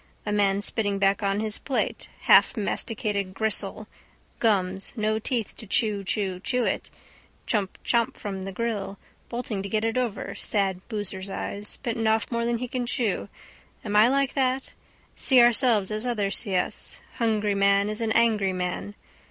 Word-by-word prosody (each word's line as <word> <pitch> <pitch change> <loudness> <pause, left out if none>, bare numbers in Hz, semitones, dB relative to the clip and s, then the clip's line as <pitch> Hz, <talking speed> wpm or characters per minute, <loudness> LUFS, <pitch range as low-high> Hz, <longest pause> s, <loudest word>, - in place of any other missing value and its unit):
A 210 - -2
man 200 -1 +2
spitting 205 -1 +1
back 195 +1 +2
on 200 0 0
his 215 -1 -1
plate: 270 - -2 0.2
halfmasticated 205 -3 +2
gristle: 215 -1 -1 0.5
gums: 195 -4 +1
no 215 -1 0
teeth 230 -1 -2
to 220 - -10
chewchewchew 205 +2 0
it. - - -2 0.6
Chump 205 -5 -1
chop 235 -1 +1
from 195 -2 -5
the 195 +1 -5
grill. 205 -1 -3 0.3
Bolting 235 -4 -3
to 200 - -5
get 215 +1 0
it 225 +2 +1
over. 240 -5 -3
Sad 195 -3 -1
booser's 200 -3 -4
eyes. 205 +1 -5
Bitten 225 -2 -1
off 220 +2 +1
more 235 0 0
than 235 0 +1
he 250 +2 -4
can 245 0 -3
chew. 230 -5 -1 0.6
Am 205 -1 -2
I 215 +2 +7
like 275 +1 +1
that? 265 -1 0 0.4
See 260 -2 +5
ourselves 235 -4 +4
as 215 +3 -1
others 205 -5 0
see 200 -5 -2
us. 180 - -2 0.2
Hungry 215 -3 +1
man 200 0 +3
is 215 +2 -3
an 225 -1 0
angry 215 -5 +3
man. 185 +3 -3
215 Hz, 160 wpm, -26 LUFS, 200-235 Hz, 0.6 s, I